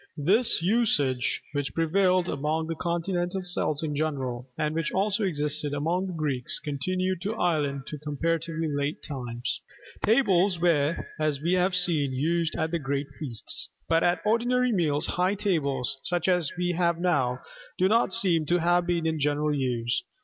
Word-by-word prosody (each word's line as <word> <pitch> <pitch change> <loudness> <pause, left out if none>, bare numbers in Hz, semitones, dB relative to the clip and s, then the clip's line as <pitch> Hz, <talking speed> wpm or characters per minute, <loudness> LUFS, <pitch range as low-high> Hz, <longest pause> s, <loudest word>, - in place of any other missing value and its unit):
This 190 - +2
usage, 160 - +2
which 145 -2 -3
prevailed 180 +2 +2
among 155 +2 -1
the 165 - -3
continental 175 +2 -2
Celts 170 -3 0
in 150 -2 -2
general, 135 -5 -3
and 150 0 -1
which 165 0 -1
also 200 +2 +1
existed 150 -4 -1
among 170 +6 -1
the 185 - -5
Greeks, 145 -6 -1
continued 185 +5 -2
in 210 +3 -2
Ireland 150 -8 0
to 150 - -7
comparatively 165 +2 -2
late 145 0 -2
times. 120 -4 -4 0.4
Tables 195 -6 +3
were, 165 -3 +1
as 155 -2 0
we 170 +3 +1
have 185 0 +2
seen, 160 -7 +2
used 165 +4 0
at 160 0 -1
the 170 - 0
great 140 0 -2
feasts. 120 -8 -1 0.2
But 165 0 +3
at 175 -1 +2
ordinary 245 +3 +2
meals, 155 -6 +1
high 185 +3 +1
tables, 140 - 0
such 175 -1 -1
as 180 -5 +3
we 180 0 0
have 170 -1 +1
now, 140 -9 +1 0.4
do 185 - +3
not 225 0 +3
seem 175 -7 +2
to 175 - +3
have 175 +1 +2
been 170 -2 0
in 160 -1 0
general 150 +1 +1
use. 125 -3 -1
165 Hz, 165 wpm, -27 LUFS, 145-180 Hz, 0.4 s, Tables